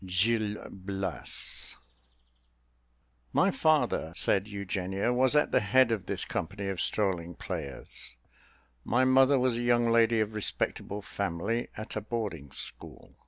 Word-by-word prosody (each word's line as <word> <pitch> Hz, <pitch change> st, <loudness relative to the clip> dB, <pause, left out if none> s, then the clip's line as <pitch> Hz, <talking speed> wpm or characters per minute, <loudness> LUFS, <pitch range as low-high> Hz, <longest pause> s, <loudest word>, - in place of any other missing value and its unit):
Gil 105 Hz, +3 st, +1 dB
Blas. 95 Hz, 0 st, -2 dB, 1.6 s
"My -, -, +4 dB
father," 145 Hz, -, +2 dB
said 100 Hz, +1 st, +1 dB
Eugenia, 100 Hz, +1 st, -2 dB
"was 130 Hz, +3 st, +3 dB
at 150 Hz, -, +3 dB
the -, -, +4 dB
head 115 Hz, +4 st, +4 dB
of 110 Hz, -4 st, -2 dB
this -, -, -1 dB
company 100 Hz, +4 st, -3 dB
of 95 Hz, -2 st, -2 dB
strolling 90 Hz, -5 st, -1 dB
players; 80 Hz, -9 st, -7 dB, 0.7 s
my 125 Hz, +3 st, +2 dB
mother 135 Hz, +1 st, +5 dB
was 125 Hz, -2 st, +1 dB
a -, -, -2 dB
young 120 Hz, -1 st, +3 dB
lady 115 Hz, 0 st, +4 dB
of 110 Hz, 0 st, 0 dB
respectable 105 Hz, -1 st, -2 dB
family, 100 Hz, +6 st, -2 dB
at 110 Hz, -, -7 dB
a 110 Hz, -, -2 dB
boarding 105 Hz, -, -4 dB
school. -, -, -7 dB
105 Hz, 130 wpm, -29 LUFS, 95-120 Hz, 1.6 s, mother